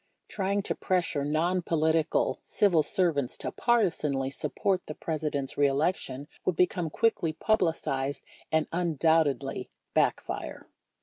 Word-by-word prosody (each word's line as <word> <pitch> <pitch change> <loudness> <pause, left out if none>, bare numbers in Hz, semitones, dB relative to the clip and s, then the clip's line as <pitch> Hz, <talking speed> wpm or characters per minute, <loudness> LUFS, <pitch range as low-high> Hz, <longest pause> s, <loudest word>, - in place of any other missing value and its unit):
Trying 200 0 -1
to - - 0
pressure 175 -6 0
"non 165 +5 +1
political" 160 -1 +1
civil 180 -6 +3
servants 160 - +1
to - - -4
partisanly 150 - +1
support 180 +7 -1
the 155 - -6
Presi 155 -1 -2
dent's 140 -1 -3
re 145 - +6
election 140 -1 -1 0.2
would 185 - 0
become 180 -1 +1
quickly 175 -4 +1
publicized 160 -9 0 0.3
and 160 -1 +2
un 170 -2 0
doubtedly 160 -3 +1 0.2
backfire. - - -1
160 Hz, 125 wpm, -28 LUFS, 145-180 Hz, 0.3 s, re